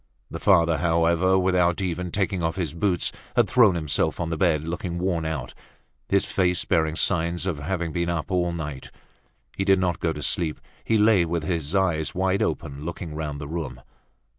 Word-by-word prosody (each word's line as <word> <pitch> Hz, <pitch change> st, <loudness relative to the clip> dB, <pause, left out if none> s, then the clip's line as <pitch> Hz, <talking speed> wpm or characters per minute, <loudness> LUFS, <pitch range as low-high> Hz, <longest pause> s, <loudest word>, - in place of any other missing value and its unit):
The -, -, -5 dB
father 85 Hz, -1 st, +4 dB
however, 85 Hz, +3 st, +3 dB
without 90 Hz, -2 st, +2 dB
even 90 Hz, -1 st, -2 dB
taking 95 Hz, 0 st, -1 dB
off 80 Hz, 0 st, -1 dB
his 85 Hz, -6 st, -3 dB
boots, 90 Hz, +1 st, 0 dB, 0.2 s
had -, -, +4 dB
thrown 120 Hz, -8 st, +5 dB
himself 75 Hz, -5 st, 0 dB
on 85 Hz, -1 st, -2 dB
the -, -, 0 dB
bed 80 Hz, -2 st, +2 dB
looking 85 Hz, +1 st, -3 dB
worn 85 Hz, -2 st, -1 dB
out, 80 Hz, -6 st, -4 dB, 0.6 s
his 100 Hz, 0 st, +2 dB
face 90 Hz, -2 st, 0 dB
bearing 80 Hz, -1 st, +1 dB
signs 85 Hz, +2 st, 0 dB
of 85 Hz, -6 st, -2 dB
having 85 Hz, +2 st, -2 dB
been 85 Hz, +2 st, -1 dB
up 85 Hz, +1 st, -3 dB
all 90 Hz, -1 st, +1 dB
night. 75 Hz, -5 st, -6 dB, 0.7 s
He 95 Hz, -, -1 dB
did 95 Hz, 0 st, +4 dB
not 90 Hz, -3 st, 0 dB
go 80 Hz, -, 0 dB
to 75 Hz, -2 st, -6 dB
sleep, 80 Hz, +3 st, -1 dB, 0.2 s
he 110 Hz, -, +2 dB
lay 105 Hz, -3 st, +5 dB
with 85 Hz, -1 st, -2 dB
his 80 Hz, 0 st, -2 dB
eyes 85 Hz, -5 st, 0 dB
wide 95 Hz, +1 st, +1 dB
open, 70 Hz, +1 st, -3 dB
looking 85 Hz, -1 st, -6 dB
round 75 Hz, -2 st, -4 dB
the 75 Hz, -, -6 dB
room. 75 Hz, -6 st, -5 dB
85 Hz, 190 wpm, -24 LUFS, 80-95 Hz, 0.7 s, thrown